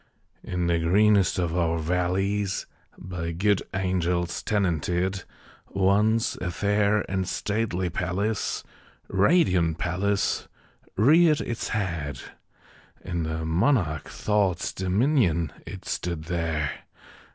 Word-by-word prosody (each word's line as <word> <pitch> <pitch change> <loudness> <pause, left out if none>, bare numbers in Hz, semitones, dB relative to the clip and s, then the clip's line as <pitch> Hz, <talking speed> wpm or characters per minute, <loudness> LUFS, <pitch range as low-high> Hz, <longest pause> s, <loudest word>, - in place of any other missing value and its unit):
In 90 -1 -2
the 85 -1 +2
greenest 100 +3 +3
of 85 -2 -1
our 85 -2 +1
valleys 95 +4 0 0.3
By 85 -2 -5
good 100 +3 +2
angels 90 -2 -1
tenanted, 90 -1 0 0.4
Once 105 +4 +2
a 90 - -3
fair 105 +2 +1
and 95 -1 -2
stately 100 -4 -1
palace 100 +4 -2 0.5
Radiant 95 - +3
palace 100 +3 0 0.5
reared 155 - +5
its 115 - -3
head. 85 - -2 0.9
In 85 -2 -2
the 80 0 -3
monarch 85 - +1
Thought's 100 -5 0
dominion 95 - +1
It 95 +2 -8
stood 85 -3 -3
there! 80 -3 -1
95 Hz, 100 wpm, -26 LUFS, 85-100 Hz, 0.9 s, reared